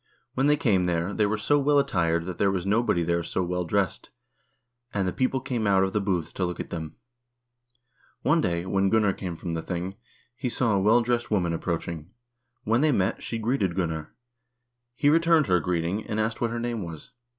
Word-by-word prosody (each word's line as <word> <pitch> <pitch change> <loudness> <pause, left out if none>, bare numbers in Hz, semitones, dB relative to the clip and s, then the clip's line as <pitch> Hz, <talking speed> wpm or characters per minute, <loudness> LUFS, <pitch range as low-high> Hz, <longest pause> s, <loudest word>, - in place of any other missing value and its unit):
When 135 +2 +1
they 150 0 +4
came 100 -10 +2
there, 90 +2 -1
they 105 -2 +2
were 110 +1 0
so 145 +7 +2
well 145 +1 +3
attired 85 -11 +1
that 90 -2 -6
there 100 - +3
was 95 -2 -2
nobody 100 -4 +2
there 85 +1 0
so 90 +2 -2
well 90 0 -2
dressed, 95 +1 -1 0.8
and 100 -2 -1
the 90 - -1
people 130 0 0
came 120 -4 -2
out 95 -1 +4
of 95 - -1
the 105 - +1
booths 90 -5 -1
to 95 - -2
look 90 -1 -2
at - - -6
them.... 80 -2 -5 1.3
One 155 +4 +3
day 85 - -1
when 95 +1 +1
Gunnar 105 -2 +3
came 90 -3 -5
from 85 0 -5
the 80 - -2
thing, 90 +2 -4 0.4
he 130 -1 -3
saw 120 -2 +1
a 100 - +3
well 110 +5 +5
dressed 120 0 -1
woman 90 -6 +1
approach 85 0 -2
ing. 80 -1 -6 0.5
When 115 +4 +2
they 155 0 +4
met, 95 -7 0
she 115 - -4
greeted 110 -6 0
Gunnar. 80 -4 -3 0.8
He 145 - +1
returned 165 0 +4
her 90 -5 +3
greet 85 -1 -1
ing, 100 +6 -2
and 110 -1 -2
asked 110 +1 -1
what 120 - +1
her 120 +1 -3
name 120 -2 -2
was. 85 - -8
100 Hz, 215 wpm, -26 LUFS, 85-120 Hz, 1.3 s, well